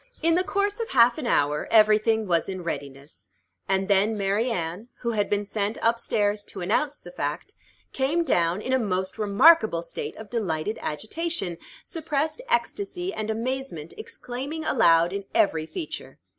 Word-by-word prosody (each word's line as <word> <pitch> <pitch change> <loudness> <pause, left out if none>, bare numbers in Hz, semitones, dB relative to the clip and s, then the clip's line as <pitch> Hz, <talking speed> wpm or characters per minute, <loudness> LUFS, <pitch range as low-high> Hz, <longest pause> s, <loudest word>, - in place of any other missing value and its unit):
In 330 0 +4
the 360 +2 +3
course 405 +2 -1
of 460 - -3
half 245 +3 +5
an 265 - -3
hour 150 -6 +1
every 215 -1 +6
thing 220 0 +1
was 170 -2 +1
in 185 -2 -5
readiness; 140 - -7 0.4
and 195 0 +1
then 205 +2 +3
Mary 200 +4 +1
Anne, 180 +1 -3
who 235 - -1
had 205 -3 0
been 205 0 0
sent 205 +1 -2
up 230 +1 +3
stairs 205 -2 0
to 190 - -7
announce 290 +11 0
the - - -11
fact, - - -4 0.4
came 290 +6 +1
down 175 - +1
in 260 - -1
a 260 - +4
most 190 -3 -2
remarkable 215 - +5
state - - -6
of 220 -1 -10
delighted 205 -3 -2
agitation, 215 - -3 0.2
suppressed 315 - -2
ecstasy 385 -5 -1
and 215 0 -4
amazement 230 - -3
exclaiming 275 +6 -5
aloud 170 -6 +4
in 200 0 -4
every 160 -5 +2
feature. 330 - -6
215 Hz, 165 wpm, -25 LUFS, 185-270 Hz, 0.4 s, every